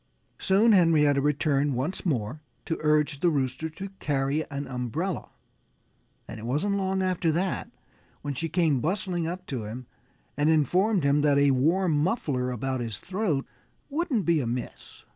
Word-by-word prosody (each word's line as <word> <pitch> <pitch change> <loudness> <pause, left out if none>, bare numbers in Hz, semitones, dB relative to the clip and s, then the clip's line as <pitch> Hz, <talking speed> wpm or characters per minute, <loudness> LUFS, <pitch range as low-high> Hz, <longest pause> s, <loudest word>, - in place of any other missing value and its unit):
Soon 205 +4 +4
Henrietta 155 -7 +4
returned 145 -1 +1
once 155 +10 -2
more 130 0 -2 0.2
to 165 - -2
urge 150 -1 +2
the 175 - +3
Rooster 140 +1 -1
to 195 +5 -7
carry 140 +1 0
an 140 0 -4
umbrella. 135 - -3 1.0
And 110 - -8
it 110 - -8
wasn't 195 +11 0
long 190 -1 0
after 185 -3 +1
that 180 +3 -1 0.5
when 145 -1 -2
she 165 +5 -3
came 160 -7 +2
bustling 175 - -1
up 180 +2 -5
to 125 -7 -4
him 120 +4 -7 0.5
and 145 +2 +2
informed 180 - +2
him 140 +1 +3
that 145 -1 +3
a 140 0 +5
warm 165 +8 +2
muffler 145 - 0
about 130 +2 -2
his 115 -4 -4
throat 180 - -1 0.5
wouldn't 290 - 0
be 170 -2 +3
amiss. 120 -2 -5
150 Hz, 155 wpm, -27 LUFS, 135-180 Hz, 1.0 s, a